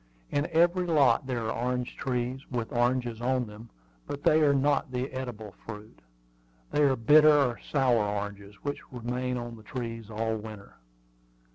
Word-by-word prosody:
In 145 Hz, +1 st, +1 dB
every 175 Hz, +2 st, +3 dB
lot 145 Hz, -4 st, +4 dB
there 120 Hz, -3 st, -2 dB
are -, -, -1 dB, 0.2 s
orange 125 Hz, -1 st, -2 dB
trees, 125 Hz, 0 st, -2 dB
with 120 Hz, -3 st, -3 dB
oranges 120 Hz, -1 st, 0 dB
on 130 Hz, 0 st, +1 dB
them; 110 Hz, +2 st, -11 dB, 0.4 s
but 145 Hz, 0 st, -5 dB
they 155 Hz, +1 st, +5 dB
are 145 Hz, -2 st, +5 dB
not 140 Hz, 0 st, +2 dB
the 125 Hz, 0 st, -1 dB
eatable 115 Hz, -6 st, -6 dB
fruit. 105 Hz, -1 st, -9 dB, 0.7 s
They 150 Hz, -, +2 dB
are 140 Hz, -2 st, +4 dB
bitter 150 Hz, +6 st, +6 dB
or 135 Hz, -5 st, +3 dB
sour 125 Hz, -6 st, +3 dB
oranges, 100 Hz, 0 st, -4 dB
which 145 Hz, 0 st, -3 dB
remain 125 Hz, +1 st, -3 dB
on 120 Hz, -1 st, -6 dB
the -, -, -13 dB
trees 115 Hz, -1 st, -6 dB
all 110 Hz, +1 st, -1 dB
winter. 105 Hz, -2 st, -10 dB
125 Hz, 160 wpm, -28 LUFS, 115-135 Hz, 0.7 s, bitter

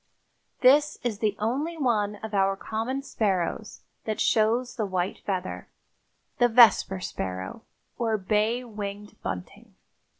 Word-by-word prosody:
This 290 Hz, +3 st, +5 dB
is 225 Hz, -4 st, -2 dB
the 210 Hz, -2 st, 0 dB
only 280 Hz, +10 st, -2 dB
one 215 Hz, -7 st, +1 dB
of 220 Hz, -1 st, -6 dB
our 195 Hz, -1 st, +2 dB
common 230 Hz, +7 st, -3 dB
sparrows 210 Hz, -4 st, -2 dB, 0.2 s
that 215 Hz, -1 st, -2 dB
shows 230 Hz, +3 st, +2 dB
the 220 Hz, -5 st, -1 dB
white 185 Hz, 0 st, -2 dB
feather—the 190 Hz, +5 st, -4 dB
vesper 225 Hz, -5 st, +5 dB
sparrow, 95 Hz, -, -5 dB, 0.4 s
or 225 Hz, -2 st, +1 dB
bay 215 Hz, +5 st, 0 dB
winged 210 Hz, -2 st, -7 dB
bunting. 90 Hz, -2 st, -7 dB
215 Hz, 120 wpm, -26 LUFS, 195-240 Hz, 0.4 s, This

